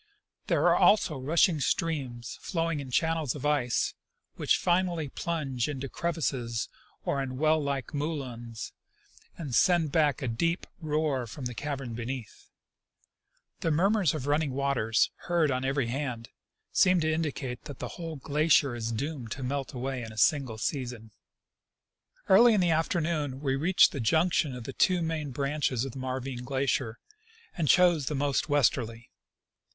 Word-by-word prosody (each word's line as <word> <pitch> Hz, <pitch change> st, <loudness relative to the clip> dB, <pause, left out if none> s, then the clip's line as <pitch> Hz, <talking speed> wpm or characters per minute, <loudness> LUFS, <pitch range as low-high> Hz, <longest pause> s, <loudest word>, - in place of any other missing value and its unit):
There -, -, +2 dB
are -, -, +5 dB
also 200 Hz, -6 st, +4 dB
rushing 160 Hz, +4 st, +3 dB
streams, 135 Hz, -6 st, -2 dB
flowing 165 Hz, -3 st, -1 dB
in 135 Hz, -2 st, -7 dB
channels 160 Hz, +1 st, 0 dB
of 145 Hz, -, -6 dB
ice, 140 Hz, -5 st, +1 dB, 0.4 s
which -, -, +2 dB
finally 175 Hz, -4 st, +1 dB
plunge 140 Hz, -6 st, -2 dB
into 135 Hz, -1 st, -4 dB
crevasses 130 Hz, -10 st, -2 dB, 0.4 s
or 140 Hz, -, 0 dB
in 130 Hz, -1 st, -4 dB
well 155 Hz, +2 st, +3 dB
like 140 Hz, -4 st, -3 dB
moulins 130 Hz, -7 st, -4 dB, 0.6 s
and 145 Hz, -7 st, -6 dB
send 165 Hz, +2 st, +3 dB
back 150 Hz, -3 st, +2 dB
a -, -, -1 dB
deep 165 Hz, +10 st, 0 dB
roar 150 Hz, -5 st, -1 dB
from 130 Hz, +4 st, -8 dB
the 125 Hz, -, -3 dB
caverns 135 Hz, -3 st, -4 dB
beneath. 120 Hz, -1 st, -6 dB, 1.1 s
The 165 Hz, -, 0 dB
murmurs 185 Hz, +1 st, +2 dB
of 140 Hz, -4 st, -4 dB
running 145 Hz, -1 st, +1 dB
waters, 130 Hz, -5 st, +1 dB, 0.2 s
heard 170 Hz, -4 st, +2 dB
on 130 Hz, 0 st, -1 dB
every 135 Hz, -1 st, 0 dB
hand, 120 Hz, -2 st, -4 dB, 0.4 s
seem 185 Hz, -1 st, +5 dB
to 155 Hz, 0 st, +1 dB
indicate 145 Hz, -6 st, -3 dB
that 145 Hz, -, -8 dB
the -, -, -5 dB
whole 165 Hz, -2 st, -6 dB
glacier 145 Hz, -2 st, +2 dB
is 115 Hz, -1 st, -3 dB
doomed 135 Hz, 0 st, -4 dB
to 135 Hz, -, -7 dB
melt 135 Hz, +1 st, -2 dB
away 130 Hz, 0 st, -3 dB
in 110 Hz, -2 st, -7 dB
a 110 Hz, -, -12 dB
single 130 Hz, -1 st, +2 dB
season. 120 Hz, -3 st, -4 dB, 1.2 s
Early 225 Hz, +4 st, +7 dB
in -, -, +3 dB
the 175 Hz, -2 st, +3 dB
afternoon 155 Hz, -4 st, 0 dB
we 135 Hz, -2 st, 0 dB
reached 175 Hz, +7 st, +4 dB
the 140 Hz, -, -5 dB
junction 155 Hz, +3 st, +2 dB
of 125 Hz, -, -7 dB
the -, -, -6 dB
two 180 Hz, -2 st, +2 dB
main 160 Hz, -3 st, -2 dB
branches 140 Hz, -2 st, -1 dB
of 135 Hz, -, -5 dB
the 135 Hz, -, -8 dB
Marvine 130 Hz, -1 st, -4 dB
glacier, 130 Hz, -3 st, -1 dB, 0.6 s
and 165 Hz, -4 st, -1 dB
chose 170 Hz, -1 st, +4 dB
the 150 Hz, -, -1 dB
most 140 Hz, +2 st, 0 dB
westerly. 120 Hz, -5 st, +1 dB
140 Hz, 155 wpm, -29 LUFS, 125-160 Hz, 1.2 s, Early